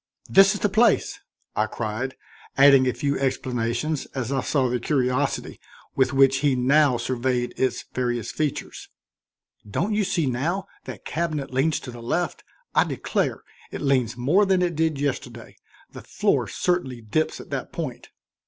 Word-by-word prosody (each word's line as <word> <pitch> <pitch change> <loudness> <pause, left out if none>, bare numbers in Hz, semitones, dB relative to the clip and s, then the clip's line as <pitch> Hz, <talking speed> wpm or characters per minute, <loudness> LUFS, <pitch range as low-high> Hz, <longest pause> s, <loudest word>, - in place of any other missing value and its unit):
"This 195 +1 +6
is - - -6
the - - +3
place," 220 +2 +2 0.4
I 110 - +1
cried, 120 +4 -4 0.4
adding 135 -1 +7
a - - +3
few 140 -1 -1
explanations 130 +2 -1
as 130 -1 -3
I 135 -1 +1
saw 135 -2 +1
the 125 0 -1
curiosity 130 +1 -1 0.4
with 130 -1 +2
which 135 -1 +4
he 140 -1 +2
now 135 +1 +3
surveyed 125 0 -1
its 130 - -1
various 120 -3 -2
features. 150 -3 -4 0.8
"Don't 195 - -1
you 210 0 +2
see 180 -4 0
now 155 +10 -1 0.2
that - - -9
cabinet 155 -5 -3
leans 140 +4 +1
to 125 - -8
the 120 -1 -10
left? 165 +7 -2 0.3
I - - +5
declare - - -2 0.3
it - - -6
leans 125 -4 +1
more 150 +12 +3
than 190 -2 +2
it 175 -2 -1
did 160 -2 0
yesterday; 125 -4 -4 0.4
the - - -10
floor - - 0
certainly 135 -9 -1
dips 115 +9 -1
at - - -12
that - - -4
point." - - -6
135 Hz, 160 wpm, -24 LUFS, 125-155 Hz, 0.8 s, adding